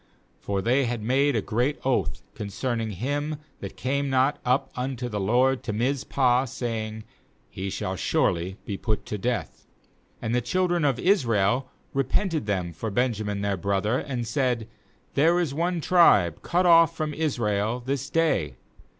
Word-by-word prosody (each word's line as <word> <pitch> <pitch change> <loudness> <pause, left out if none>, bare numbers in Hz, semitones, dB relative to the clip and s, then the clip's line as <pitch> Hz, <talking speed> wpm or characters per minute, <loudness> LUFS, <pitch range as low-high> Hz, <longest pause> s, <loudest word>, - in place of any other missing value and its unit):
For 100 -1 -2
they 130 +4 +3
had 120 -2 -3
made 135 +4 +2
a 110 - 0
great 125 +7 0
oath 130 -2 0
con 105 - -6
cerning 115 +1 -2
him 145 - -2 0.2
that - - -8
came 140 +2 -1
not 135 +2 +2
up 125 +2 +1
unto 125 -1 -3
the 105 -3 -3
LORD 125 +6 +2
to 105 - -4
Mizpah, 125 +1 +1
saying: 110 -3 -4 0.5
'He 95 +1 -4
shall 95 0 -3
surely 90 +1 0
be 100 - -4
put 110 0 -2
to 105 - -4
death.' 120 +2 -3 0.6
6And 110 - -1
the 125 - +2
children 175 +5 +1
of 135 -4 +2
Israel 125 - +2 0.2
repented 140 - 0
them 90 -4 -1
for 110 +8 -4
Benjamin 105 -3 -1
their 100 -1 0
brother, 100 +5 0
and 125 -4 -3
said: 120 -2 0 0.5
'There 165 +5 +4
is 165 -6 -1
one 170 +3 0
tribe 105 - +4
cut 180 +1 +1
off 165 -1 +6
from 155 -1 -2
Israel 115 -7 0
this 135 0 -2
day. 160 - +1
125 Hz, 160 wpm, -26 LUFS, 105-140 Hz, 0.6 s, off